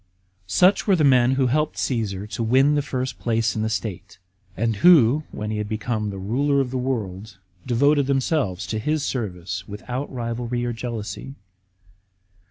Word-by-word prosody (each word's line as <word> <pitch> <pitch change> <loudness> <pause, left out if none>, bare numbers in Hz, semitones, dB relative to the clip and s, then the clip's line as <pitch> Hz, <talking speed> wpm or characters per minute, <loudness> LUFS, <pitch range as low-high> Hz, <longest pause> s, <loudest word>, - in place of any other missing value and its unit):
Such 185 - +3
were 195 - +5
the 160 - +1
men 130 -2 +5
who 135 0 +2
helped 150 +5 0
Caasar 105 -6 -2
to - - -3
win 130 +6 +4
the 145 - +2
first 130 -2 -4
place 115 -2 0
in 110 - -1
the 110 - 0
state; 100 -3 -5 0.4
and 110 +1 0
who, 150 - +5
when 105 0 -5
he 105 - -2
had 105 -1 -4
become 110 -1 -2
the 100 - -6
ruler 135 +9 +1
of 130 -2 -1
the 130 - -2
world, 110 -6 -4 0.3
devoted 140 +3 +3
themselves 135 - 0
to 110 +4 -3
his 150 +5 -1
service 95 -7 -4
without 125 +7 -5
rivalry 120 -1 -3
or 120 - -2
jealousy. 115 +3 -6
120 Hz, 170 wpm, -23 LUFS, 105-135 Hz, 0.4 s, were